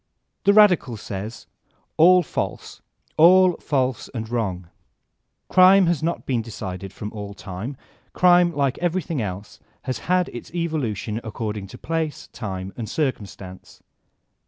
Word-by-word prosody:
Xhe 200 - +5
radical 180 - +5
says: 105 +2 -7 0.5
All 180 +3 +6
false, - - -5 0.4
all 180 +3 +7
false 130 -3 -1
and 110 -1 -4
wrong. 95 -7 -2 0.8
Crime 185 +1 +6
has 170 -3 +1
not 165 +2 -2
been 125 -4 0
decided 95 -4 -7
from 105 +2 -7
all 100 -2 -7
time: 105 +10 -7 0.3
crime, 175 -1 +5
like 140 -5 -1
everything 170 -4 -1
else, 100 0 -6 0.2
has 130 - -3
had 180 -1 +3
its 120 - -9
evolution 125 - -2
according 105 -2 -5
to - - -11
place, 160 -3 -3
time, 95 -4 -5
and 115 -3 -6
circumstance. 100 - -5
125 Hz, 130 wpm, -23 LUFS, 105-170 Hz, 0.8 s, all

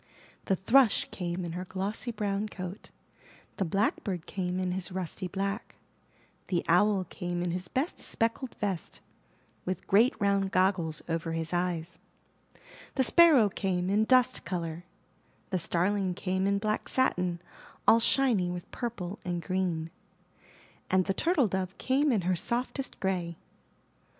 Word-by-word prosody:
The 190 - +2
Thrush 225 +5 +4
came 175 0 -3
in 170 - -4
her 180 +2 -4
glossy 195 +6 -3
brown 210 -2 -2
coat; 185 +2 -7 0.7
The 195 - 0
Blackbird 190 -1 -1
came 185 -2 -2
in 185 -1 -1
his 185 0 -3
rusty 185 0 -4
black; 195 +4 -3 0.7
The 175 -3 0
Owl 190 +3 +4
came 175 0 -4
in 175 - -1
his 180 +1 -3
best 270 - -2
speckled 230 +3 -1
vest, 195 -6 -3 0.6
with 185 -1 -4
great 225 +6 +4
round 200 -1 +2
goggles 185 -4 +1
over 165 0 -2
his 165 +1 -3
eyes; 175 -1 -1 1.0
The 265 - +3
Sparrow 300 -5 +7
came 185 -2 -1
in 215 +2 +3
dust 255 +1 +3
color; 170 -1 -4 0.7
The 185 - +1
Starling 185 +2 0
came 190 +1 -1
in 200 0 +2
black 215 +1 -1
satin, 180 -9 +1 0.5
all 230 - +8
shiny 230 -7 +3
with 175 -1 -6
purple 215 -6 -4
and 175 -1 -2
green; 170 -3 -2 1.0
and 185 -1 +3
The 195 - 0
Turtle 310 - +2
Dove 190 -1 -3
came 275 +3 +2
in 215 -5 +2
her 180 +1 +1
softest 250 - -2
gray. 180 -3 -1
190 Hz, 140 wpm, -29 LUFS, 175-210 Hz, 1.0 s, all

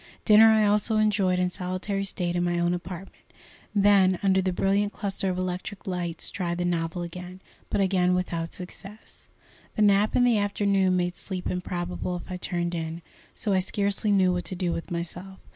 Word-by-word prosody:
Dinner 215 0 +8
I 220 -1 +4
also 210 +2 +2
enjoyed 205 -4 +2
in 180 0 0
solitary 185 +3 -3
state 175 -2 -2
in 175 - +1
my 175 0 0
own 175 0 +1
apartment, 180 +1 -7 0.5
then, 195 -2 +5
under 190 -1 +3
the 185 0 0
brilliant 200 +3 +1
cluster 195 -1 -2
of 180 - -2
electric 185 +2 -4
lights, 175 -3 -2
tried 175 -2 -2
the 175 - -1
novel 170 0 -1
again, 180 +2 -8 0.3
but - - 0
again 180 -2 +2
without 170 -2 -2
success. 195 +3 -10 0.5
The 215 - +2
nap 205 +1 +4
in 245 - +4
the 240 -3 +4
afternoon 200 -2 +1
made 175 0 -1
sleep 185 -2 -4
improbable 180 0 -3
if 175 - -8
I 180 - -3
turned 175 -1 -2
in, 165 0 -4 0.3
so 205 - -1
I 190 - +3
scarcely 200 +2 0
knew 190 -2 +4
what 180 0 -3
to 185 - -3
do 175 -1 -1
with 165 - -5
myself. 175 +2 -6
185 Hz, 185 wpm, -26 LUFS, 175-200 Hz, 0.5 s, Dinner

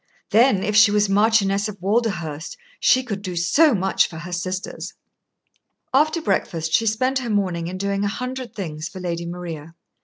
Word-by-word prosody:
Then, 215 -2 +4
if 210 - -1
she 210 0 +7
was 205 0 +2
Marchioness 205 0 +2
of 205 -2 -9
Walderhurst, 175 -7 -2 0.2
she 260 0 +4
could 205 -6 -5
do 185 -3 -5
so 230 - +4
much 190 0 +2
for 160 - -9
her 170 +2 -8
sisters." 185 +1 -4 1.0
After 310 +4 +2
breakfast 160 - -1
she 225 - +3
spent 255 +5 +1
her 245 -2 -5
morning 185 -5 -1
in 185 +2 -5
doing 200 +1 -1
a - - +1
hundred 250 +3 -5
things 160 -4 -5
for 190 - -9
Lady 170 -1 -3
Maria. 165 -2 -7
195 Hz, 175 wpm, -22 LUFS, 175-225 Hz, 1.0 s, she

